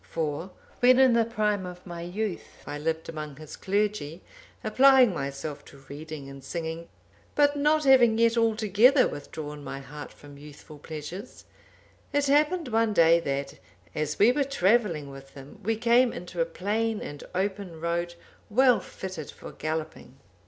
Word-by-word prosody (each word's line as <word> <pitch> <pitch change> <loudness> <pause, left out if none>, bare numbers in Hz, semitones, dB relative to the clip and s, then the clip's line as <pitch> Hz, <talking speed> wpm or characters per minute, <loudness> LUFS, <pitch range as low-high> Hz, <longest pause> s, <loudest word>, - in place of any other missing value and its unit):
For, 160 +3 -3 0.3
when 250 +1 +6
in 260 -2 +6
the 230 -1 +3
prime 210 -3 -1
of 180 0 -9
my 170 -2 -7
youth, 185 +3 -5
I 145 0 -5
lived 160 +1 -2
among 155 -3 -6
his 155 +1 -10
clergy, 195 -5 -2 0.4
applying 255 0 +5
myself 140 -1 -5
to 140 - -15
reading 150 -1 -8
and 135 -1 -11
singing, 165 +3 -5 0.5
but 290 0 +4
not 300 +2 +2
having 250 -5 +5
yet 230 0 +3
altogether 230 +3 +4
withdrawn 150 0 -7
my 135 - -6
heart 145 +2 -9
from 145 -1 -14
youthful 150 +1 -13
pleasures, 155 +6 -8 0.7
it 285 0 +2
happened 300 +2 +2
one 225 -1 +1
day 170 -2 +5
that, 140 -3 -4 0.3
as 150 -1 -2
we 220 +4 +6
were 285 +2 +1
travelling 195 - +1
with 135 0 -13
him, 135 0 -12
we 225 +3 0
came 235 +2 +3
into 175 -1 -5
a - - +3
plain 210 +6 -2
and 145 0 -7
open 190 -3 -3
road, 170 +1 -2 0.3
well 250 +2 +4
fitted 185 -6 -8
for - - -10
galloping. 155 -4 -5
180 Hz, 155 wpm, -27 LUFS, 150-230 Hz, 0.7 s, when